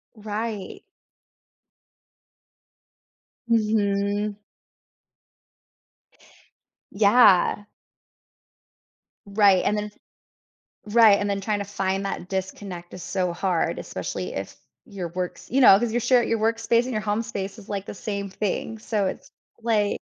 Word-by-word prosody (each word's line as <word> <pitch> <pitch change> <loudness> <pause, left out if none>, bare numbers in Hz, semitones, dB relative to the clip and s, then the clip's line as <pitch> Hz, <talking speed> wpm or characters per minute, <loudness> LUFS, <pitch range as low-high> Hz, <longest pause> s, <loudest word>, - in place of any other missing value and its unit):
Right. 210 -1 -5 2.7
Mhm. 205 -2 +1 2.6
Yeah. 205 -1 +5 1.6
Right, 200 -2 +4
and 210 - +1
then 210 - -2
s 210 - -12 0.9
Right, 215 -1 +6
and 205 0 -1
then 200 0 -1
trying 205 +1 -1
to 200 - -3
find 195 -1 -2
that 190 -2 -5
disconnect 190 -2 -5
is 180 - -8
so 180 -3 -1
hard, 175 -1 0
especially - - -5
if - - -6 0.3
your 185 -4 -6
work's 180 +2 -6
you 270 +3 +3
know, 195 -6 +9
'cause 230 -1 -1
you 240 - +2
share 245 +1 +3
your 230 -1 0
workspace 230 +1 +2
and 255 - -4
your 215 - -1
home 210 +1 -1
space 200 -1 -5
is, 195 - -15
like, 200 -1 -3
the - - -7
same 200 0 -4
thing, 210 +3 -3
so 215 -2 -1
it's - - -6 0.3
like 215 -3 +1
205 Hz, 120 wpm, -24 LUFS, 195-220 Hz, 2.7 s, know